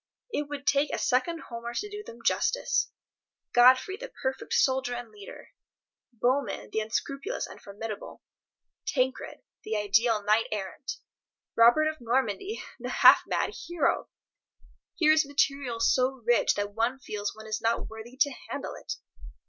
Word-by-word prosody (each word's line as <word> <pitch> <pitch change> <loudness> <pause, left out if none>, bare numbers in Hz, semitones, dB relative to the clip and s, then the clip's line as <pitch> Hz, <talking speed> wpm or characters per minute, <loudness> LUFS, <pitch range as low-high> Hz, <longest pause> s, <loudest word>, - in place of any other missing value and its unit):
It 295 0 -2
would 285 -1 -6
take 285 +1 +2
a - - -1
second 320 +7 +1
Homer 235 0 -7
to 415 - -2
do 415 0 -7
them 235 - -12
justice. - - +1 0.6
Godfrey 255 +10 +6
the - - -8
perfect 265 0 -2
soldier 260 -2 +2
and 240 -2 -7
leader, 205 -2 -12 0.6
Bohemund 250 +3 -1
the - - 0
unscrupulous 275 - -3
and - - -12
formidable, 210 +1 -7 0.6
Tancred 260 -7 -1 0.2
the 215 0 -2
ideal 210 +1 +2
knight 215 +2 +3
errant, 210 +5 -4 0.6
Robert 240 +7 +6
of 310 -3 -4
Normandy 250 - -1 0.2
the - - -5
half - - +7
mad - - 0
hero! 345 -2 -1 0.9
Here 310 -4 +4
is 310 0 +5
material 275 -4 0
so 255 +2 +2
rich 240 0 +3
that 205 0 -3
one 230 +4 0
feels 210 -6 -4
one 220 0 -11
is 215 0 -3
not 230 +1 0
worthy 225 +3 -10
to 285 -1 +4 0.2
handle - - -4
it. - - -6
245 Hz, 150 wpm, -28 LUFS, 220-285 Hz, 0.9 s, half